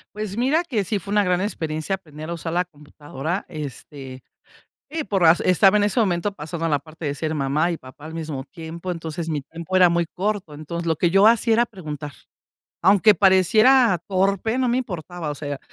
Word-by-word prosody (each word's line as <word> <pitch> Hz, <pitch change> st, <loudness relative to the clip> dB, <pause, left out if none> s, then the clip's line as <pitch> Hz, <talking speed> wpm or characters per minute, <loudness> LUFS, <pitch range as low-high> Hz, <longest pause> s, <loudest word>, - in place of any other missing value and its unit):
Pues 210 Hz, -2 st, -4 dB
mira 270 Hz, +8 st, +2 dB
que 230 Hz, -10 st, -1 dB
sí 200 Hz, +2 st, -2 dB
fue 200 Hz, +4 st, -6 dB
una 210 Hz, 0 st, +4 dB
gran 180 Hz, -2 st, +1 dB
experiencia 160 Hz, -3 st, -2 dB
aprender 155 Hz, -4 st, -10 dB
a -, -, -2 dB
usar 165 Hz, -1 st, -5 dB
la 180 Hz, +2 st, +1 dB
computadora, 150 Hz, +1 st, -6 dB
este, 140 Hz, -4 st, -8 dB, 0.7 s
sí, 315 Hz, 0 st, -3 dB
pero 195 Hz, -8 st, +2 dB, 0.2 s
estaba 190 Hz, +3 st, +5 dB
en 205 Hz, -, +3 dB
ese 210 Hz, +4 st, +1 dB
momento 195 Hz, -1 st, 0 dB
pasando 165 Hz, -1 st, -5 dB
la 150 Hz, -3 st, +2 dB
parte 155 Hz, +3 st, -12 dB
de 145 Hz, -1 st, -1 dB
ser 155 Hz, +2 st, -3 dB
mamá 150 Hz, +4 st, 0 dB
y 170 Hz, -, -2 dB
papá 135 Hz, +2 st, -13 dB
al 160 Hz, -, -8 dB
mismo 155 Hz, -5 st, -5 dB
tiempo, 165 Hz, +4 st, -8 dB
entonces 165 Hz, -1 st, -5 dB
mi 150 Hz, -3 st, -2 dB
tiempo 165 Hz, +5 st, -5 dB
era 180 Hz, -1 st, +6 dB
muy 170 Hz, 0 st, +1 dB
corto, 195 Hz, -3 st, -3 dB
entonces 170 Hz, +3 st, -6 dB
lo 160 Hz, -, +1 dB
que 170 Hz, +2 st, +1 dB
yo 195 Hz, +3 st, +5 dB
hacía 230 Hz, 0 st, +4 dB
era 235 Hz, +2 st, +3 dB
preguntar, 150 Hz, -, -7 dB, 0.7 s
aunque 200 Hz, +4 st, +6 dB
pareciera 200 Hz, +4 st, +5 dB
torpe, 195 Hz, +4 st, 0 dB
no 255 Hz, -2 st, +1 dB
me 240 Hz, -, +1 dB
importaba, 175 Hz, -, -4 dB
o -, -, -3 dB
sea, 145 Hz, 0 st, -7 dB
de 145 Hz, -1 st, -4 dB
175 Hz, 200 wpm, -22 LUFS, 155-200 Hz, 0.7 s, era